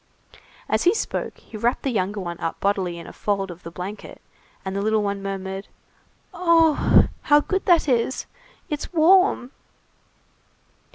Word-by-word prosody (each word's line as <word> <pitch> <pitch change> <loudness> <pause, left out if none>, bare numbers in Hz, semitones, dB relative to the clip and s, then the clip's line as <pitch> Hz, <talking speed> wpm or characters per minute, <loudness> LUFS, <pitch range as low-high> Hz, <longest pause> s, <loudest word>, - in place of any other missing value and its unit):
As - - 0
he 360 +5 +5
spoke, - - -3
he - - -15
wrapped 235 +3 0
the 270 - 0
younger 205 -1 -1
one 175 -2 -5
up 165 - -3
bodily 190 -3 0
in 170 - -9
a - - -10
fold 195 -2 -2
of 175 0 -12
the 170 - -8
blanket, 185 +5 -8 0.5
and 190 0 -3
the 200 - -1
little 215 0 +1
one 200 -1 -2
murmured:— 195 0 -5 0.7
"Oh! 330 -3 +4 0.2
how 295 0 +5
good 380 +5 -2
that 345 -4 +4
is! 250 0 0 0.4
It's 300 -4 -4
warm!" 345 -5 +4
210 Hz, 155 wpm, -23 LUFS, 190-305 Hz, 0.7 s, he